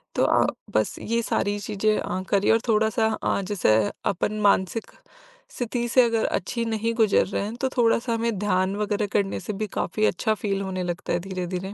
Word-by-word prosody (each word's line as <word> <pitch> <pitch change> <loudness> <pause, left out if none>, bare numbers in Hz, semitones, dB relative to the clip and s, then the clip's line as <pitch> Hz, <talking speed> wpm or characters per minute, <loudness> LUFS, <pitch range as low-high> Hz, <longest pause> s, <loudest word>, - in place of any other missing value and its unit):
तो - - +2
अ, - - +4 0.3
बस 110 0 +1
ये 230 +1 -1
सारी 205 -1 0
चीज़ें 215 +1 0
अ, 185 - -3
करिए 200 0 +3
और 225 - +4
थोड़ा-सा 220 +1 +2 0.2
अ, - - +1
जैसे 185 - +2 0.4
अपन 210 +3 -2
मानसिक 200 +2 +1 0.6
स्थिति 240 - -2
से 255 +2 +5
अगर 230 -2 +1
अच्छी 235 +6 -2
नहीं 225 0 -1
गुजर 220 -3 +3
रहे 195 - -2
हैं 215 +3 -5
तो 265 - +1
थोड़ा-सा 235 0 +2
हमें 230 -2 -1
ध्यान 190 -1 +1
वगैरह 210 0 -1
करने 200 -2 0
से 210 - -4
भी 215 - 0
काफ़ी 215 +4 0
अच्छा 220 -2 +1
फील 195 -2 -2
होने 185 -1 -3
लगता 175 -1 -3
है 175 - +1
धीरे-धीरे। 185 +1 -4
210 Hz, 190 wpm, -25 LUFS, 190-225 Hz, 0.6 s, से